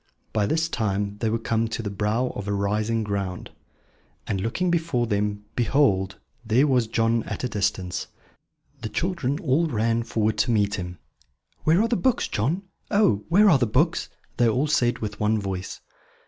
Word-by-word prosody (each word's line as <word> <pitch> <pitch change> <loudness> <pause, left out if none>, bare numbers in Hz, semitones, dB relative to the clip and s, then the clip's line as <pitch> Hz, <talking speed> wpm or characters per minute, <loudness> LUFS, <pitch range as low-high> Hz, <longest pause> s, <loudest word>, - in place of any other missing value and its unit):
By 105 -2 +1
this 160 +4 +1
time 105 -6 -2
they 115 - 0
were 115 - +1
come 115 0 0
to 115 +1 -4
the 100 - -3
brow 105 +5 0
of 100 - -5
a 100 - 0
rising 105 +3 0
ground; 100 -3 -4 0.7
and 95 - -2
looking 170 - 0
before 160 -8 +1
them, 105 -1 -1
behold, 110 -6 +2 0.3
there 120 +5 +3
was 125 -5 +2
John 115 +1 +1
at 110 - -5
a - - +1
distance! 95 -4 -2 0.7
The 110 - -4
children 145 - -1
all 165 -1 +1
ran 115 -3 +1
forward 110 -2 -1
to - - +2
meet 105 -3 +2
him. 90 -1 -5 0.7
"Where 165 +7 +4
are - - +2
the 235 0 +1
books, 260 -2 +1
John? 150 - -1 0.3
Oh, 200 - +2
where 205 +5 +6
are 155 -9 +6
the 120 - +2
books?" 145 +10 +1 0.3
they 120 - +4
all 125 +6 +1
said 120 -5 +2
with 105 -2 -5
one 110 +1 +2
voice. 95 -2 -5
115 Hz, 175 wpm, -25 LUFS, 105-140 Hz, 0.7 s, where